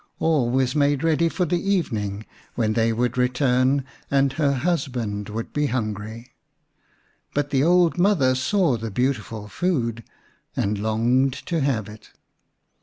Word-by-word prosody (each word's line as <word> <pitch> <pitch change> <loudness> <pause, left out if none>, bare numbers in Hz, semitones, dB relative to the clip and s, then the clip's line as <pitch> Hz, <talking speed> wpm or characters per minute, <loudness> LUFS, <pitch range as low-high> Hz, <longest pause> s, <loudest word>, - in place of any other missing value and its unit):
All 150 -7 +2
was 130 +2 +1
made 145 0 +2
ready 165 +1 +2
for 180 +2 -1
the 175 +1 0
even 190 - 0
ing, 100 +1 -5 0.3
when 110 -2 +1
they 115 0 +2
would 125 +2 -1
return 130 +1 +2 0.2
and 135 -1 +2
her 145 -3 +1
husband 125 - -2
would 115 +2 -5
be 150 0 +1
hungry. 110 0 -4 1.0
But 145 0 0
the 135 -2 +2
old 175 +1 +3
mother 175 -9 +3
saw 130 - +1
the 115 0 -5
beautiful 110 -2 -2
food 115 - -1 0.5
and 100 0 -1
longed 120 +5 +2
to 170 -2 -1
have 130 -7 0
it. 105 0 -13
130 Hz, 145 wpm, -23 LUFS, 115-150 Hz, 1.0 s, old